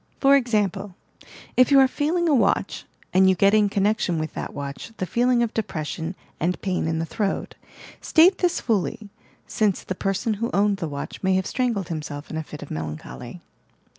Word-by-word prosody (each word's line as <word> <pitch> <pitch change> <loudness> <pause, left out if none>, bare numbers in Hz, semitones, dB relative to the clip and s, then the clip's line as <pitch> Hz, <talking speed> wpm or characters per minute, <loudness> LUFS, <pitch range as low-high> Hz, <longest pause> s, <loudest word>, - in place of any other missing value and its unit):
For 275 0 +6
esaraple: 205 -7 0 0.6
If 255 -1 +5
you 280 -1 +6
are 265 - +6
feeling 325 +6 0
a 310 - +3
watch, 250 - +1 0.3
and 190 0 +5
you 190 - +4
get 195 +3 +4
in 210 -1 +4
connection 200 -3 +1
with 155 0 -3
that - - -5
watch 140 +9 -7
the 185 - -2
feeling 240 +4 +2
of 230 - -2
de 225 - +1
pression 160 -1 -5 0.2
and 175 +3 0
pain 185 -4 -1
in 160 0 -1
the 165 - -1
throat, 200 +3 -2 0.5
state 350 +4 +5
this 355 -2 +1
fully, 215 -1 -1 0.4
since 210 -5 0
the - - -3
person 195 +3 -1
who 230 - 0
owned 200 0 +2
the 165 -5 -4
watch 140 -1 -6
may 190 0 +2
have 190 0 0
strangled 230 -8 -1
himself 150 -2 -6
in 160 - -4
a - - -1
fit 150 -1 -9
of 145 - -11
melancholy. 75 -5 -7
195 Hz, 195 wpm, -24 LUFS, 165-235 Hz, 0.6 s, For